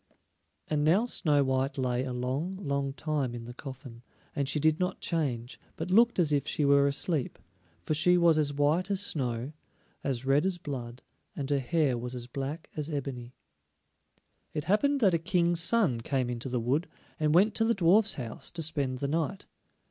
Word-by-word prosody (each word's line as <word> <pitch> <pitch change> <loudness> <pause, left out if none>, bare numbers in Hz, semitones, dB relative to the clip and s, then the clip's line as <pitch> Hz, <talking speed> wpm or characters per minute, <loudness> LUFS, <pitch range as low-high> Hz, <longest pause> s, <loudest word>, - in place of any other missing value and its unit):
And 150 -1 0
now 180 +9 +4
Snow 150 -11 +2
white 130 +1 0
lay 125 -1 0
a 130 - -4
long, 130 +8 -2
long 140 -7 -2
time 145 -4 -2
in 115 -1 -7
the 120 - -8
coffin, 130 -3 -9 0.3
and 140 -1 -1
she 150 - 0
did 155 +1 +2
not 180 0 -1
change, 135 -7 -2 0.2
but 165 +3 -5
looked 235 +4 +5
as 160 -5 +2
if 145 0 0
she 150 - 0
were 140 0 +5
asleep; 145 0 -1 0.5
for - - -1
she 180 +4 +4
was 170 -2 +4
as 145 -2 +2
white 150 +6 +1
as 200 -2 +1
snow, 130 - -2 0.5
as 130 -2 -2
red 135 +3 +3
as 185 -2 -1
blood, 130 -6 -7 0.3
and 140 0 -4
her 140 - +3
hair 135 -2 +1
was 125 +1 -5
as 120 -1 -5
black 140 +5 -5
as 150 0 -3
ebony. 130 -4 -5 1.2
It 150 - -1
happened 275 - +2
that 195 -5 +4
a 165 - +2
King's 170 +1 +1
son 175 - +3
came 130 0 -1
into 120 +2 -4
the 125 -1 -1
wood, 135 +9 0 0.3
and 155 0 +2
went 205 +5 +5
to 225 - +2
the 230 +1 +2
dwarfs' 195 +4 +4
house 125 +1 -5
to 170 -2 -4
spend 140 -5 -1
the 140 - -2
night. 165 +6 -2
145 Hz, 190 wpm, -29 LUFS, 130-170 Hz, 1.2 s, looked